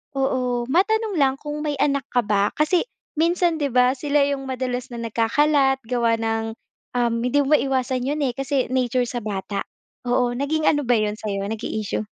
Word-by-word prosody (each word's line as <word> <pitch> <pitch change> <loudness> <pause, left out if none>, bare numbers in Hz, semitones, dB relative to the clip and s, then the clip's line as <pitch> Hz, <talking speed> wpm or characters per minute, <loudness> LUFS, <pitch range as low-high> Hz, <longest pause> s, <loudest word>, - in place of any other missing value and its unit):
oo, 250 -3 0
matanong 415 +5 +2
lang 270 -2 +3
kung 300 0 -4
may 295 - 0
anak 280 -2 +1
ka 245 - +3
ba? 205 -1 +2
Kasi, 310 +4 +2 0.3
minsan 340 0 +2
'di 285 - +1
ba, 250 +1 +4
sila 290 +1 +1
'yong 275 -1 -2
madalas 255 0 -3
na 235 - -5
nagkakalat, 270 +5 +2
gawa 235 -1 +1
ng, 225 0 -1 0.4
um, 235 -1 +2
hindi 285 +4 +2
mo 300 - +2
maiiwasan 260 -2 0
'yon 295 +2 -1
eh, 250 - -1
kasi 270 -1 -1
nature 250 -1 +1
sa 240 -1 -4
bata. 200 -1 -3 0.5
Oo, 245 0 +2
naging 305 +4 -1
ano 290 -1 +2
ba 245 - +4
'yon 210 -1 0
sa'yo? 200 -2 -3
Naging 220 0 -4
issue? 210 - -2
255 Hz, 180 wpm, -23 LUFS, 235-290 Hz, 0.5 s, ba